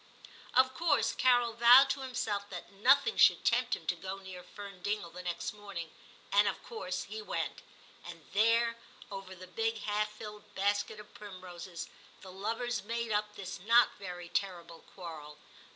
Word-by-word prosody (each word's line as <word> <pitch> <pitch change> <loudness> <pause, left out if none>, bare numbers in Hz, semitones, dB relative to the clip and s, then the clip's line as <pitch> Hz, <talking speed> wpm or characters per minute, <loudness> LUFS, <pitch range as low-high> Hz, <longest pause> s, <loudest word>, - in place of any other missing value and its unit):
Of 260 +1 +5
course 330 +5 +2
Carol 245 -2 +3
vowed 240 +4 +8
to - - -2
himself 245 -6 -3
that 180 0 -8
nothing 280 - +4
should - - +6
tempt - - +3
him - - -12
to - - +1
go 190 +1 -6
near 190 -2 -9
Fern 195 0 -10
Dingle 205 -3 -2
the 180 +2 -8
next 175 +1 -3
morning, 200 -6 -7 0.4
and 205 +1 +5
of - - -2
course 460 - -4
he 435 - -7
went; - - -3 0.4
and - - -10
there, 230 +2 +3 0.3
over 195 -1 -7
the 185 0 -10
big 225 +4 -2
half 210 0 0
filled 210 -1 -10
basket 205 +2 0
of 210 - -13
primroses, 185 -4 -8 0.3
the 190 - -10
lovers 225 +3 -2
made 230 +1 -3
up 210 0 0
this 190 -3 -6
not 230 +6 +5
very 180 -3 -7
terrible 170 -2 -3 0.2
quarrel. 155 -5 -8
205 Hz, 165 wpm, -32 LUFS, 185-230 Hz, 0.4 s, vowed